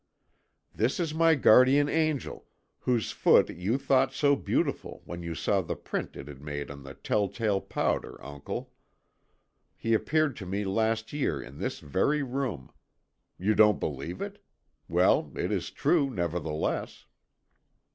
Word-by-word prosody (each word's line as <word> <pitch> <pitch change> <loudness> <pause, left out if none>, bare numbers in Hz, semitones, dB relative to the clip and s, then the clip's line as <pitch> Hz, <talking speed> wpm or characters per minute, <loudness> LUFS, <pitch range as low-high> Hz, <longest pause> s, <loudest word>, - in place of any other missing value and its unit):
"This 115 +10 0
is 165 -3 -1
my 165 0 +4
guardian 130 +2 +6
angel, 155 -3 -1 0.3
whose 120 -3 0
foot - - +4
you 95 +9 -1
thought 135 -1 +2
so 145 -1 +3
beautiful - - -2
when 85 0 -7
you 85 -1 -5
saw 100 +4 +1
the 85 - -4
print - - -5
it 70 - -8
had 70 -2 -10
made 75 -1 -5
on 70 0 -10
the 70 0 -10
tell 105 -1 0
tale 100 -1 -1
powder, - - -2
uncle. 70 -1 -6 1.1
He 115 - 0
appeared 150 +4 +1
to 95 - -7
me 100 +2 -2
last 110 +4 0
year 135 - -1
in 65 +1 -10
this - - -2
very 140 - +1
room. 125 - -4 0.7
You 100 +4 +1
don't 105 -1 +5
believe 75 +5 -4
it? - - -8 0.5
Well, - - +3
it - - -2
is - - -1
true, 150 -6 +2
nevertheless." 85 - -3
110 Hz, 145 wpm, -28 LUFS, 85-135 Hz, 1.1 s, guardian